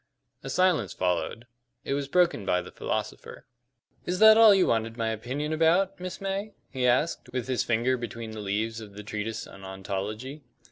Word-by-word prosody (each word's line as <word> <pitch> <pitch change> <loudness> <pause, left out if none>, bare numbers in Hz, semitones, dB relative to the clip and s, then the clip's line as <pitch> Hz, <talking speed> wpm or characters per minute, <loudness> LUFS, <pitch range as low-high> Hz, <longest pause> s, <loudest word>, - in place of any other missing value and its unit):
A - - -7
silence 175 - +2
followed. 90 +5 -1 0.4
It - - -2
was 140 0 -2
broken 175 - +2
by 90 -2 +1
the - - -11
philosopher. - - -5 0.6
"Is 180 - 0
that 220 +2 +8
all 225 -1 +8
you 195 -2 +5
wanted 115 0 0
my 115 -1 0
opinion 130 +8 -3
about, 175 +5 +2
Miss 185 0 -6
May?" 195 +1 -4 0.2
he 130 -2 0
asked, 125 +1 +1
with 125 -2 -2
his 130 -2 0
finger 120 +2 +1
between 115 -2 -6
the 110 - -7
leaves 110 +3 -2
of 105 -2 -11
the 105 - -8
treatise 105 +1 -4
on 95 - -13
ontology. 100 +8 -5
120 Hz, 180 wpm, -27 LUFS, 110-170 Hz, 0.6 s, that